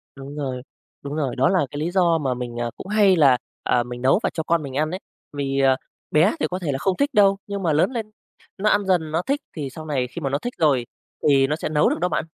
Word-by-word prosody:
Đúng 140 +1 -9
rồi, 130 -4 -3 0.4
đúng 140 +1 -5
rồi, 140 -5 -1
đó 135 +5 +3
là 185 -6 +2
cái 145 - -5
lý 165 +3 -1
do 175 -3 +3
mà 135 -4 -1
mình, 120 -1 -6
ờ, 120 -1 -2
cũng - - -9
hay 205 -2 +4
là, 140 -6 +5 0.3
à, 120 -1 +2
mình 120 0 -8
nấu 135 +10 +4
và - - +2
cho 160 - -2
con 165 -1 +1
mình 135 -2 -7
ăn 155 +2 0
ấy, 185 - -4 0.3
vì, 140 -1 -1
ờ, 135 -1 +4 0.4
bé 170 - +4
thì - - +1
có 180 +1 -3
thể 160 -5 -2
là 135 - -1
không 185 +7 0
thích 285 +1 0
đâu, 195 -3 +5
nhưng 200 -1 -4
mà 160 -3 +2
lớn 155 - +3
lên 220 -3 -4 0.5
nó 210 +2 +2
ăn 205 -1 +2
dần 170 -5 +1
nó 165 +2 +1
thích 280 +7 -1
thì 145 -4 -4
sau 155 +4 -9
này 135 -5 -1
khi 130 - -8
mà 135 - -1
nó 140 - 0
thích 245 +10 -5
rồi, 135 -6 +2 0.4
thì 135 -2 +5
nó 150 - 0
sẽ 160 - -4
nấu 150 -1 +3
được - - -2
đó 180 +1 +1
bạn. - - -1
155 Hz, 280 wpm, -23 LUFS, 135-185 Hz, 0.5 s, là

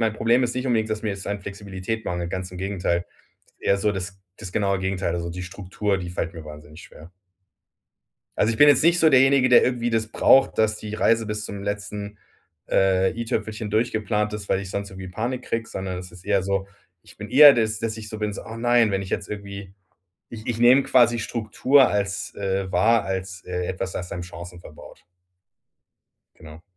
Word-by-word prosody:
mein 110 -2 +1
Problem 115 +3 +2
ist 120 - -2
nicht 125 +1 -3
unbedingt, 110 -3 +1
dass 110 0 -3
mir 105 -2 -1
es 100 0 -8
an 100 -1 -3
Flexibilität 100 +2 -6
mangelt, 85 -1 -3
ganz 95 -1 -4
im 90 - -10
Gegenteil. 90 -3 -1 0.5
Eher 100 - +1
so 105 +1 +1
das 95 0 -6 0.2
das 90 - -9
genaue 100 -2 0
Gegenteil. 95 -2 -2
Also, 85 0 -3
die 90 +1 -6
Struktur, 100 +2 -3
die 90 -2 -6
fällt 90 0 -3
mir 80 -3 -10
wahnsinnig 75 +1 -12
schwer. 85 +4 -15 1.3
Also, 110 - +3
ich 110 - -4
bin 145 - +8
jetzt 145 0 +5
nicht 175 +1 +4
so 160 - +5
derjenige, 135 -1 +5
der 125 - +7
irgendwie 120 -1 0
das 110 -1 -1
braucht, 135 +3 +4
dass 110 0 +2
die 105 -1 -8
Reise 115 +1 +2
bis 105 0 -4
zum 100 -1 -7
letzten, 105 0 -5 0.5
äh, 95 -1 +3
i-Tüpfelchen 110 -2 -3
durchgeplant 110 -1 0
ist, 105 -1 -6
weil 95 - +1
ich 95 -1 -7
sonst 100 0 -4
irgendwie 95 0 -8
Panik 120 +7 -3
kriege, 115 0 -3
sondern 95 -1 -5
das 90 0 -8
ist 90 0 -14
eher 100 -2 +1
so, 95 0 -1 0.3
ich - - -18
bin - - -8
eher 145 0 +9
dass 110 -2 0
dass 115 0 -3
ich 110 -1 -8
so 110 - -7
bin 105 -1 -2
so: - - -7
„Oh 110 - -8
nein.“ 120 -2 +3
wenn 95 - -1
ich 95 - -7
jetzt - - -3
irgendwie 100 -2 -8 0.6
ich 110 -2 -10
ich 115 -2 -2
nehme 125 +3 +6
quasi 120 -3 +4
Struktur 120 +4 +2
als, 100 0 -2
äh, 95 -1 -2
wahr 110 +5 +3
als, 95 -1 -5
äh, 90 0 -3
etwas 95 0 -4
das 90 0 -6
einem 90 - -4
Chancen 90 -1 -10
verbaut. 75 - -14 1.3
Genau. 80 0 -13
100 Hz, 205 wpm, -23 LUFS, 95-115 Hz, 1.3 s, eher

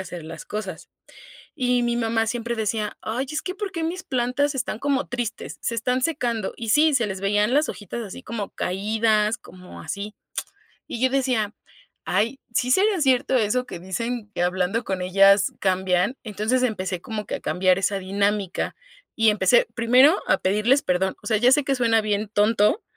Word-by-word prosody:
hacer 175 -3 -7
las 160 0 -8
cosas, 195 -6 -6 0.7
y 250 -1 +1
mi 240 0 0
mamá 225 -1 +1
siempre 235 +1 -2
decía: 215 -1 -2
"Ay 235 +5 -2
es 305 0 -2
que, 365 - -4
¿por 400 -1 -5
qué 330 -3 -3
mis 345 +3 -3
plantas 255 +3 0
están 240 -4 -3
como 280 0 0
tristes?, 240 -1 -4
se 235 - -1
están 250 +3 0
secando". 240 -9 -1
Y 230 - -6
sí, 300 +6 +5
se 235 -5 +2
les 190 -1 -5
veían 210 +4 +2
las 300 +2 +3
hojitas 215 +3 -6
así 210 +5 -9
como 225 -5 -5
caídas, 215 +3 0
como 180 0 -13
así. 205 +1 -6 0.7
Y 235 - -5
yo 260 - +4
decía: 250 -6 0 0.5
"Ay, 230 +6 0
¿sí 250 +2 +1
sería 390 +5 +3
cierto 265 -1 +2
eso 245 +3 +1
que 180 - -8
dicen 210 +4 -4
que 175 - 0
hablando 185 +5 0
con 190 -5 -3
ellas 195 +2 +5
cambian?" 185 +3 +1
Entonces, 220 +4 -1
empecé 190 -7 -2
como 210 +1 -5
que - - -3
a - - -6
cambiar 185 0 +2
esa 195 +1 0
dinámica 200 0 -1 0.4
y 225 -1 +4
empecé 200 +2 +4
primero 250 +9 +5
a - - +4
pedirles 215 +9 +2
perdón, 185 +1 0
o - - -6
sea, 220 -2 +2
ya 245 +4 +4
sé 290 +2 +4
que 275 +1 0
suena 230 -3 +3
bien 210 0 -1
tonto, 210 - +2
225 Hz, 185 wpm, -23 LUFS, 200-250 Hz, 0.7 s, sí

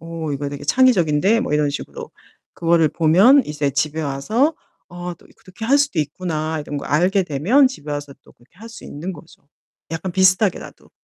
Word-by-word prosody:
어 165 -2 -5
이거 140 +1 -3
되게 145 0 -8
창의적인데?' 195 - +3
뭐 150 - -3
이런 150 -1 +1
식으로 140 - -7 0.4
그거를 165 -2 +2
보면 190 - +5
이제 150 -1 -2
집에 155 +3 -1
와서 215 - 0 0.3
'어 175 0 -7
또 - - -22
이 - - -23
그렇게 190 +4 -11
할 275 +5 +4
수도 285 - 0
있구나.' 155 0 -3
이런 145 0 -6
걸 - - -8
알게 180 +5 +2
되면 185 - +3
집에 155 - -9
와서 145 -1 -5
또 - - -20
그렇게 120 +7 -28
할 225 - -11
수 230 - -12
있는 170 +6 -6
거죠 165 0 -15 0.5
약간 165 +3 -4
비슷하게라도. 190 +1 +1
165 Hz, 370 characters per minute, -20 LUFS, 150-195 Hz, 0.5 s, 보면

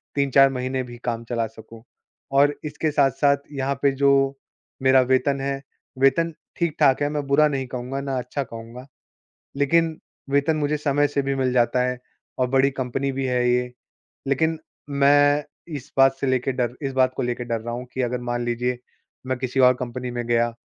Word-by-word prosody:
3-4 135 -1 +5
महीने 130 0 -2
भी 120 -1 -10
काम 115 -1 -2
चला 115 -1 0
सकूँ। 110 +1 -14 0.5
और 145 +1 +4
इसके 150 +1 -2
साथ-साथ 140 0 +3 0.2
यहाँ 135 0 -1
पे 140 - +5
जो 140 0 +4 0.7
मेरा 130 0 +6
वेतन 130 +2 +1
है, 135 0 -2 0.4
वेतन 160 +5 +3 0.2
ठीक-ठाक 150 -5 +2
है। 145 - +1
मैं 145 -1 -3
बुरा 145 +2 +4
नहीं 135 -2 -3
कहूँगा 125 +2 -4
ना 135 -1 -3
अच्छा 125 +3 -3
कहूँगा। 115 +2 -10 0.7
लेकिन 160 +3 +2 0.3
वेतन 140 +3 +2
मुझे 150 0 0
समय 145 -1 +1
से 140 0 -1
भी 135 0 -1
मिल 130 -1 0
जाता 125 0 +2
है 125 0 -5 0.4
और 130 - +2
बड़ी 135 +1 +3
कंपनी 135 +1 -2
भी 135 0 -3
है 125 -1 +1
ये। 125 0 +1 0.6
लेकिन 160 +4 +1 0.3
मैं 145 +1 +4 0.3
इस 135 -3 -8
बात 135 0 +5
से 140 - 0
लेके 130 0 +1
डर 125 -1 -2
इस 135 -1 -2
बात 130 -1 +2
को - - -2
लेके 120 0 -2
डर 115 -2 -2
रहा 120 +1 -5
हूँ 125 +1 -6
कि 130 - -2
अगर 125 0 -2
मान 120 0 -2
लीजिए 120 +1 -1 0.5
मैं 130 -1 -1
किसी 130 +1 -2
और 125 -1 +7
कंपनी 125 0 -4
में 120 -1 -4
गया 120 0 +1
135 Hz, 185 wpm, -23 LUFS, 125-140 Hz, 0.7 s, और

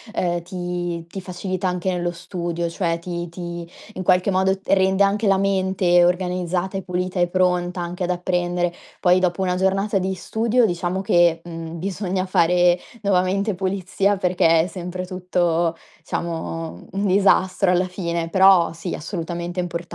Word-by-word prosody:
uhm, 175 -1 0
ti 175 -2 -4
ti 190 +2 -7
facilita 185 +1 -3
anche 180 +1 -1
nello 175 -1 -1
studio, 170 -1 -4
cioè 170 -1 -1
ti 175 0 -5
ti 170 -1 -7 0.2
in - - -5
qualche 185 +2 +3
modo 190 +1 +2
t - - -27
rende 190 0 +4
anche 205 +2 +1
la 195 -1 +4
mente 190 -2 +2
organizzata 180 +1 0
e 195 - -1
pulita 180 0 -3
e 175 - +3
pronta 180 0 0
anche 175 +1 -4
ad 180 - -1
apprendere. 175 -1 0 0.3
Poi 180 0 +4
dopo 185 +1 0
una 180 -1 0
giornata 195 +2 +1
di 190 +1 -2
studio, 225 +6 +1
diciamo 175 0 -1
che, 175 -4 +3
mhmm, 165 -1 -7
bisogna 185 +1 -2
fare 175 -1 +3 0.2
nuovamente 195 +2 +1
pulizia 190 +1 0
perché 175 -3 +3
è - - 0
sempre 180 +1 -5
tutto 175 -2 0 0.3
diciamo 165 -1 -4
un 200 +1 -2
disastro 190 -1 +3
alla 180 +1 +2
fine,e 170 -2 -3
però 190 -2 +5
sì 165 +2 -5
assolutamente 175 +1 -4
importante. 175 -1 -2
180 Hz, 155 wpm, -22 LUFS, 175-190 Hz, 0.3 s, però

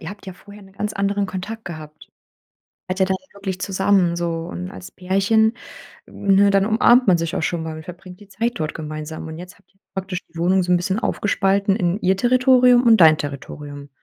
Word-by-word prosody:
Ihr 165 - -7
habt 200 0 -11
ja 190 - -6
vorher 205 +2 -15
'nen 195 - -17
ganz 210 +2 -4
anderen 200 0 -1
Kontakt 215 +4 -6
gehabt. 155 -3 -10 0.8
Wart 185 +1 -3
ja 190 - +4
dann 190 0 -1 0.2
wirklich 190 -2 -5
zusammen 190 -3 +1
so 170 -1 -3
und 90 +1 -6
als 95 -1 -11
Pärchen, 200 +5 +1 0.5
ne, 200 0 +2
dann 195 0 +3
umarmt 240 +3 +4
man 175 -2 +5
sich 165 0 -3
auch - - -2
schon 165 -1 -2
mal 160 -1 -6
und 160 - -10
verbringt 180 +1 -11
die 205 - -16
Zeit 230 +4 -2
dort 155 -1 -3
gemeinsam. 155 0 -7
Und 160 0 -8
jetzt 180 +1 -11
habt - - -33
ihr 195 - -38
praktisch 190 -1 -4
die 165 - -22
Wohnung 185 +2 +2
so 180 - -4
'n - - +5
bisschen 190 +3 -1
aufgespalten 200 -1 0
in 180 -2 0
ihr 190 +1 +2
Territorium 250 +1 +4
und 225 -3 +6
dein 155 -2 +7
Territorium. 145 0 -7
190 Hz, 210 wpm, -21 LUFS, 165-200 Hz, 0.8 s, dein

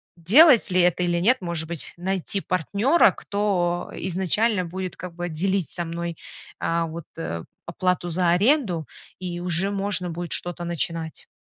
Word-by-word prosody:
делать 230 - +6
ли 180 0 +4
это 180 0 +2
или 175 -1 +1
нет, 235 +8 +3
может 170 -3 -3
быть, 170 -2 -3
найти 190 +2 -1
партнёра, 200 - +3
кто 180 -4 -1
изначально 190 +3 0
будет, 185 +2 -5
как 180 -2 -7
бы, 175 +1 -4
делить 185 +2 -1
со 175 - -4
мной, 170 0 -4 0.4
э, 170 0 0
вот, 165 0 -7
э, 85 - -4 0.2
оплату 180 0 -1
за 175 0 +2
аренду, 195 - +2 0.3
и 175 -1 -5
уже 180 +2 +1
можно 195 -2 -1
будет 170 +1 -5
что-то 175 0 -1
начинать. 165 -1 -4
175 Hz, 155 wpm, -24 LUFS, 170-195 Hz, 0.4 s, делать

